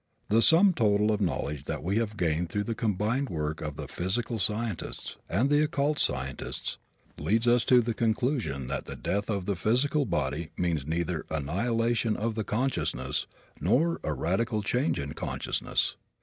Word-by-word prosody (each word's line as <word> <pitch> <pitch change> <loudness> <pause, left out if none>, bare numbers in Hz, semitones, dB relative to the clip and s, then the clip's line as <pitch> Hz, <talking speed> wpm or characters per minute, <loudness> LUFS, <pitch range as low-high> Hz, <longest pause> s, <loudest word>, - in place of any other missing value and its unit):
The 115 +2 +5
sum 180 +8 +6
total 105 -5 +3
of 105 - 0
the 100 - +2
knowledge 75 -4 -3
that - - -4
we 95 +5 0
have 110 -2 -1
gained 85 0 0
through 105 +2 -1
the 115 - -2
combined 110 +5 0
work 75 -1 -3
of 75 -2 -4
the - - -6
physical 110 +6 -2
scientists 105 -1 -2
and 110 +10 +2
the 145 +1 +4
occult 150 0 +1
scientists 65 0 -1 0.4
leads 115 +3 +1
us 120 0 +5
to 125 -1 +6
the 115 0 -1
conclusion 115 - 0
that 70 - -2
the - - -5
death 100 +2 -2
of 100 -4 -1
the 100 - 0
physical 130 - +2
body 75 - -1
means 80 -6 0
neither 85 +1 -1
the 80 - -2
annihilation 115 - 0
of 110 +1 -1
consciousness 105 - -1 0.3
nor 130 - +2
a 80 - -1
radical 105 - 0
change 125 +8 +1
in 70 +1 -4
consciousness. - - -1
105 Hz, 170 wpm, -28 LUFS, 85-120 Hz, 0.4 s, sum